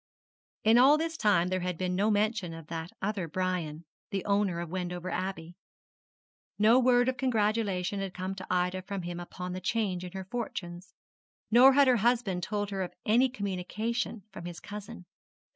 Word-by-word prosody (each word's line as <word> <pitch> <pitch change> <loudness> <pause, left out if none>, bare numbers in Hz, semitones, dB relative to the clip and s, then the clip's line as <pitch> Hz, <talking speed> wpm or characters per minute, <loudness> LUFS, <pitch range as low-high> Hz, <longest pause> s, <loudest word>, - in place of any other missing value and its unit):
In 225 +2 +6
all 275 +4 +7
this 325 +1 -2
time 200 - +3
there 185 0 0
had 180 -1 -3
been 180 0 -1
no 205 +3 +2
mention 210 -5 0
of 165 -1 -10
that 165 0 -4
other 200 -4 -1
Brian 170 -2 -2 0.2
the 195 -1 -3
owner 200 -4 +1
of 170 -1 -5
Wendover 180 0 -4
Abbey. 180 -2 -4 1.0
No 220 +4 +6
word 245 -1 +4
of 260 0 0
congratulation 210 -6 0
had 195 -1 -3
come 185 +1 -3
to 190 -1 -8
Ida 180 +1 0
from 195 0 -5
him 175 0 -5
upon 180 +1 -6
the 185 - -5
change 185 -2 -1
in 180 0 -8
her 190 -1 -5
fortunes; 185 -5 -6 0.6
nor 255 +4 +8
had 280 0 +5
her 250 -1 +5
husband 230 -5 +1
told 205 +2 -2
her 195 -1 -2
of 180 - -5
any 245 +5 +4
communication 215 +1 -3
from 170 - -8
his 175 -1 -7
cousin. 210 -1 -9
195 Hz, 175 wpm, -29 LUFS, 180-220 Hz, 1.0 s, nor